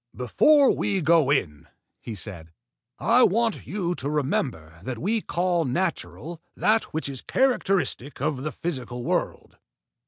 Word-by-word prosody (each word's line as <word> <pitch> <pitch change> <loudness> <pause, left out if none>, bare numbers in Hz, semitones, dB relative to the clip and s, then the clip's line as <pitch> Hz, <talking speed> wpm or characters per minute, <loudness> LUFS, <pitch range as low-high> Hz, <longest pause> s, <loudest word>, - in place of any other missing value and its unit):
"Before 275 - +4
we 195 -1 0
go 160 -3 +4
in," 75 - 0 0.3
he 115 - -7
said, 90 -5 -8 0.5
"I 240 +2 +4
want 230 0 +2
you 180 -4 -2
to 140 -4 -3
remember 125 - -2
that 120 +5 -5
we 215 - 0
call 175 -2 0
natural 135 - -3
that 220 +1 +2
which 160 -1 -4
is 135 -3 -4
characteristic 195 - 0
of 140 -1 -1
the 155 +2 -3
physical 125 -7 -5
world. - - -3
150 Hz, 135 wpm, -25 LUFS, 125-190 Hz, 0.5 s, Before